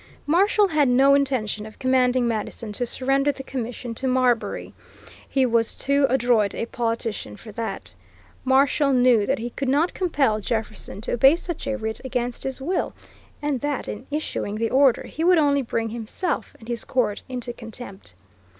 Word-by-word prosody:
Marshall 395 +6 +3
had 300 -4 +3
no 270 +3 +5
intention 260 -7 +1
of 215 - -13
commanding 255 -1 +2
Madison 220 0 -3
to 245 +4 -2
surrender 270 +3 +2
the 270 -1 -9
commission 245 -2 -5
to 260 +3 -3
Marbury. 255 -2 +1 0.6
He 265 -2 +2
was 230 -2 +1
too 280 0 +2
adroit 240 -5 +2
a - - -2
politician 230 - -3
for 220 - -11
that. 225 +2 -5 0.5
Marshall 275 +2 +3
knew 245 -4 +4
that 270 - +1
he 240 0 -5
could 270 +1 -3
not 300 +6 +2
compel 280 - +1
Jefferson 215 -2 -4
to - - -3
obey 270 +5 +6
such 345 -1 -6
a 270 - 0
writ 220 -2 -4
against 245 -2 -3
his 265 0 -3
will, 345 +7 -2 0.5
and 290 -4 -1
that 290 -2 -2
in 245 +5 -6
issuing 290 -8 -3
the 225 +1 -1
order 265 -2 +4
he 320 - -5
would 360 +1 +5
only 285 -2 +3
bring 230 -2 -2
himself 235 - -3
and 225 - -14
his 235 -2 -3
court 225 -5 0
into 245 -2 -5
contempt. 225 - -10
255 Hz, 170 wpm, -24 LUFS, 230-275 Hz, 0.6 s, obey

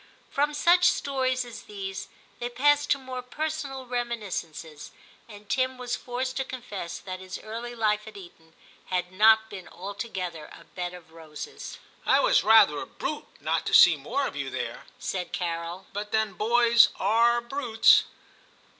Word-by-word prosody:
From 290 +1 0
such 350 +4 +4
stories 260 -2 -1
as 240 - -10
these, 195 -2 -6 0.3
they 240 - -3
passed 290 +4 +2
to - - +4
more 260 -1 -6
personal 280 0 -4
reminis 235 -5 -2
cences, 155 -2 -11 0.4
and 210 -1 -13
Tim 255 +3 0
was 250 -1 -3
forced 255 +1 -4
to 265 - 0
confess 225 -10 -6
that 185 -1 -7
his 185 0 -7
early 235 +2 -6
life 215 -1 0
at 215 - -10
Eton 165 -3 -15 0.3
had 180 -1 -2
not 220 +3 +5
been 190 -3 -8
altogether 185 -5 -6
a - - -15
bed 180 0 -6
of 175 -2 -15
roses. 160 -2 -9
* - - -30
I - - +5
was - - +4
rather 210 -9 +6
a - - -6
brute 305 - -5
not - - -1
to - - +3
see - - +9
more - - -2
of - - -5
you - - -3
there/ - - -5
said 180 -2 -4
Carol, 170 +1 -4
'but 205 +1 -5
then 220 -2 +1
boys 235 +3 +5
are 230 +4 +3
brutes.' 235 -2 +4
220 Hz, 165 wpm, -27 LUFS, 185-250 Hz, 0.4 s, see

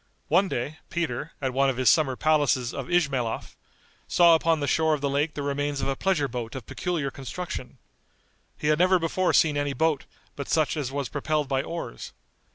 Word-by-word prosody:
One 180 +6 +4
day, 145 +5 -3
Peter, 165 -2 -3
at 130 -1 0
one 135 +1 +3
of 130 - -2
his 130 -1 0
summer 135 +2 +4
palaces 145 -5 +2
of 135 - -5
Ismaelhof, 140 -10 0 0.5
saw 170 -1 +6
upon 165 0 +3
the 145 - -1
shore 160 +1 +2
of 145 - -8
the 140 -1 0
lake 145 +2 0
the 145 - -3
remains 145 0 -1
of - - -1
a 135 - 0
pleasure 160 -4 +1
boat 120 -3 -5
of 130 -5 -6
peculiar 165 -7 -2
construction. 135 -1 -6 0.8
He 150 - -1
had 155 +1 +3
never 185 +1 +5
before 175 +2 0
seen 150 -3 +3
any 145 -1 -1
boat 160 -1 +1 0.3
but 140 - -6
such 155 -1 +2
as 140 -4 -3
was 140 -1 -2
propelled 150 +5 -1
by 135 -1 +1
oars. 165 - -6
145 Hz, 195 wpm, -26 LUFS, 135-160 Hz, 0.8 s, saw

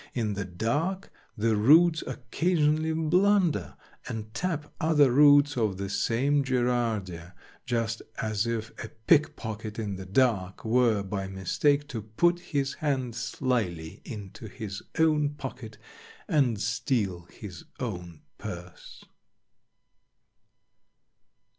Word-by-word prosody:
In 110 -4 0
the 100 0 -3
dark 145 - -2 0.3
the 110 +1 +2
roots 160 +9 +5
occasionally 155 +4 0
blunder 160 - +2 0.3
and 110 -1 -6
tap 160 -3 -3
other 150 -4 +4
roots 145 +1 +6
of 110 -6 0
the 100 0 -4
same 140 +8 +1
Gerardia, 115 -9 -1 0.3
just 115 -2 -1 0.2
as 110 +1 -1
if 115 -1 -3
a 115 - -7 0.2
pickpocket 110 -8 +1
in 105 -4 -3
the 95 0 -8
dark 100 -4 +1
were 115 -3 +3
by 95 0 -4
mistake 140 - +1
to 115 -5 -4
put 170 +12 +1
his 140 -5 -2
hand 130 -5 -1
slyly 110 -8 -2
into 105 -1 -8
his 105 -1 -7 0.2
own 150 -2 +2
pocket - - -8 0.5
and 135 - +2
steal 110 -6 -1
his 100 -6 -10
own 90 -9 -5 0.2
purse. 90 +1 -9
115 Hz, 110 wpm, -28 LUFS, 105-145 Hz, 0.5 s, roots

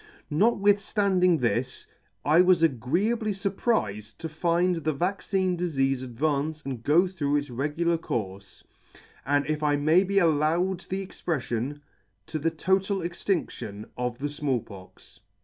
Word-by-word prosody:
Notwithflanding 200 -1 +3
this, 125 0 -1 0.4
I 155 +4 +6
was 180 -2 +4
agreeably 175 - +1
furprifed 190 - -1
to 165 - -5
find 170 +3 +1
the 155 -1 -1
vaccine 185 +3 0
difeafe 135 -7 0
advance 145 +4 -1
and 130 -4 -4
go 155 +9 +4
through 150 -6 -1
its 145 -2 -1
regular 150 +6 0
courfe; 100 -8 -5 0.6
and, 145 0 +2
if 155 +1 -2
I 150 -1 +2
may 155 +6 +4
be 200 +1 -1
allowed 170 +2 +2
the 190 +1 -4
expreflion, 145 -5 -3 0.4
to 155 - -4
the 165 +3 +1
total 190 +4 0
extindion 170 - -3
of 125 -1 -3
the 145 +3 -3
Small 145 -4 -1
Pox." 95 -3 -14
155 Hz, 130 wpm, -27 LUFS, 135-185 Hz, 0.6 s, I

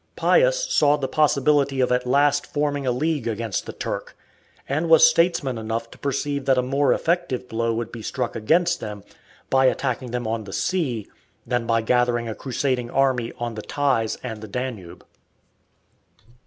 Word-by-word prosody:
Pius - - +3
saw 150 -1 +4
the 135 -2 -2
possibility 140 -2 +2
of 125 - +2
at 125 0 +1
last 145 +2 +2
forming 145 -2 -1
a - - +3
league 145 0 -1
against 115 -3 -3
the - - -4
Turk, - - -5 0.5
and 155 +5 -1
was 160 -1 +7
statesman 160 -7 +1
enough 115 +1 -4
to - - -14
perceive 140 0 -2
that 135 -1 +3
a 125 - +2
more 135 +2 +1
effective 165 -7 0
blow 115 0 -1
would 115 0 -4
be 115 - -8
struck 125 +2 -3
against 170 +11 +2
them 105 -2 -7 0.5
by 135 0 +4
attacking 130 -1 0
them 120 0 -3
on 110 -1 -2
the 95 - -9
sea 140 - -1 0.4
than 120 -1 -1
by 115 -1 +2
gathering 120 0 +1
a 110 - -3
crusading 130 0 -2
army 130 -3 +1
on 120 -1 -4
the 110 - -6
Theiss 130 -4 0
and 110 -4 -6
the 110 - -7
Danube. 110 -6 -6
130 Hz, 170 wpm, -23 LUFS, 115-145 Hz, 0.5 s, was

